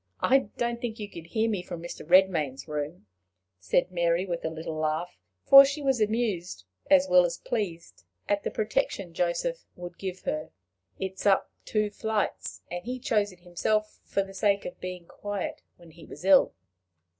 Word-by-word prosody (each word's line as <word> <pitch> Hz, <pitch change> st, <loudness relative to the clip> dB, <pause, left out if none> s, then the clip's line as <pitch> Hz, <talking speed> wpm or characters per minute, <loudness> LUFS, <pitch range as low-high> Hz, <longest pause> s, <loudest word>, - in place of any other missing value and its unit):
I 270 Hz, -3 st, +4 dB
don't 235 Hz, 0 st, -1 dB
think 230 Hz, -2 st, -3 dB
you 210 Hz, -3 st, -5 dB
could 170 Hz, -4 st, -10 dB
hear 220 Hz, +5 st, +1 dB
me 205 Hz, -5 st, -1 dB
from 175 Hz, -1 st, -7 dB
Mr. 170 Hz, +1 st, -7 dB
Redmain's 165 Hz, -6 st, +3 dB
room," 150 Hz, -1 st, -4 dB, 0.5 s
said 95 Hz, -, +1 dB
Mary, 170 Hz, 0 st, +1 dB
with 175 Hz, -2 st, -4 dB
a -, -, -1 dB
little 160 Hz, 0 st, -5 dB
laugh, 155 Hz, +3 st, -1 dB, 0.3 s
for 275 Hz, 0 st, +11 dB
she 285 Hz, +2 st, -2 dB
was 265 Hz, -4 st, +2 dB
amused 205 Hz, -, -1 dB, 0.2 s
as 190 Hz, -1 st, +6 dB
well 180 Hz, -1 st, +6 dB
as 170 Hz, -1 st, -1 dB
pleased 180 Hz, -, -4 dB, 0.2 s
at 205 Hz, 0 st, +1 dB
the -, -, -1 dB
protection 200 Hz, -4 st, -1 dB
Joseph 180 Hz, -, -1 dB
would 175 Hz, -1 st, -9 dB
give 185 Hz, -1 st, -5 dB
her; 155 Hz, 0 st, -3 dB, 0.5 s
"it 190 Hz, -1 st, -3 dB
is -, -, -1 dB
up 195 Hz, -1 st, +3 dB
two 210 Hz, -1 st, 0 dB
flights, 220 Hz, 0 st, -2 dB
and 175 Hz, 0 st, -4 dB
he 250 Hz, +2 st, -4 dB
chose 210 Hz, -5 st, +1 dB
it 180 Hz, -1 st, -18 dB
himself 215 Hz, +5 st, -1 dB
for 195 Hz, -, 0 dB
the 195 Hz, 0 st, -11 dB
sake 200 Hz, +1 st, +1 dB
of -, -, -7 dB
being 180 Hz, -1 st, -6 dB
quiet 205 Hz, +2 st, -5 dB, 0.2 s
when 170 Hz, -2 st, -16 dB
he 165 Hz, +1 st, -15 dB
was -, -, -10 dB
ill." 190 Hz, -, +6 dB
185 Hz, 180 wpm, -28 LUFS, 170-215 Hz, 0.5 s, for